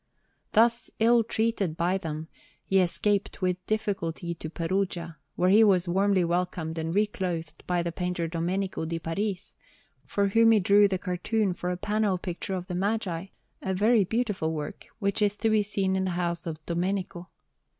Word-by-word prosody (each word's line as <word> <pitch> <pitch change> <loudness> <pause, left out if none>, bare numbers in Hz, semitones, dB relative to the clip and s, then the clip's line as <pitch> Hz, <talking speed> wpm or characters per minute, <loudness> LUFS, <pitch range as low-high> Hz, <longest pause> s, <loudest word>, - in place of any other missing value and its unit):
Thus 235 +2 +4
ill 230 +1 +4
treated 220 -7 -1
by 180 +3 +1
them, 160 -2 -5 0.4
he 195 - +3
escaped 190 +3 0
with 185 0 0
difficulty 190 -6 -2
to 160 -1 -7
Perugia, 170 -1 -2 0.2
where 180 +1 +3
he 215 +3 +7
was 190 -4 +4
warmly 190 +1 +2
welcomed 170 -2 -1
and 160 0 -2
reclothed 185 -6 -2
by 175 -1 +1
the 170 - -2
painter 180 -1 -2
Domenico 175 +3 -2
di 165 +1 -2
Paris, 190 +4 -3 0.5
for 200 -1 +1
whom 225 +2 +5
he 215 - +5
drew 205 +2 +5
the 190 -1 -1
cartoon 190 +2 -1
for 180 0 -4
a 180 - -2
panel 210 -1 0
picture 180 +2 -4
of 180 -1 -4
the 180 - -6
Magi, 190 -2 -1 0.3
a 190 - -2
very 215 +2 +4
beautiful 205 -6 -1
work, 150 -2 -6
which 200 0 0
is 205 0 +2
to 225 - +1
be 215 -1 +4
seen 195 -2 0
in 190 0 0
the - - 0
house 170 -1 -2
of 155 -1 -6
Domenico. 180 0 -2
185 Hz, 170 wpm, -27 LUFS, 170-205 Hz, 0.5 s, he